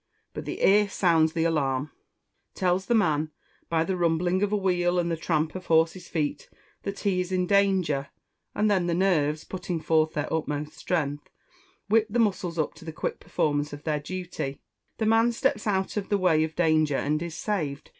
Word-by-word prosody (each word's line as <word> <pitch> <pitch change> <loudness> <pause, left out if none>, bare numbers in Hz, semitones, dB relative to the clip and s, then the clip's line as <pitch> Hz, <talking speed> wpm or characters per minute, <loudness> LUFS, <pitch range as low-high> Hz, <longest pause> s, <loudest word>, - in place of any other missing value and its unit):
But - - -6
the - - -5
ear 205 +1 +5
sounds 165 -4 +3
the 165 - 0
alarm, 145 -3 0 0.6
tells 185 0 0
the 240 - +3
man, 155 -7 +2 0.4
by 160 -1 +2
the 190 +2 -1
rumbling 175 +2 +1
of 205 0 +1
a 210 - +2
wheel, 180 -2 +1
and 170 -1 +1
the - - +1
tramp 160 -1 -1
of 185 -1 -8
horses' 165 +2 +2
feet, 150 -4 -2 0.3
that 200 0 -5
he 190 -3 +1
is 180 +1 -5
in 185 -1 +1
danger; 185 -8 +2 0.5
and 210 - +1
then 185 -3 +2
the 170 - +1
nerves, 155 -5 +1
putting 180 -2 -4
forth 160 0 +2
their 150 +1 -2
utmost 150 -1 -2
strength, 145 -4 -2 0.6
whip 220 +1 +3
the 225 - -1
muscles 190 -6 0
up 155 - 0
to - - -15
the 160 - -6
quick 155 - -4
performance 145 0 -1
of 145 - -8
their 155 -2 0
duty; 175 -4 -5 0.4
the 220 - -1
man 225 +2 +4
steps 215 -2 0
out 190 -2 0
of 200 - -3
the 205 - +2
way 170 -5 +3
of 160 0 -4
danger, 155 -4 +2
and 150 +2 0
is 170 -2 -5
saved. 155 -10 -3
170 Hz, 195 wpm, -26 LUFS, 155-190 Hz, 0.6 s, ear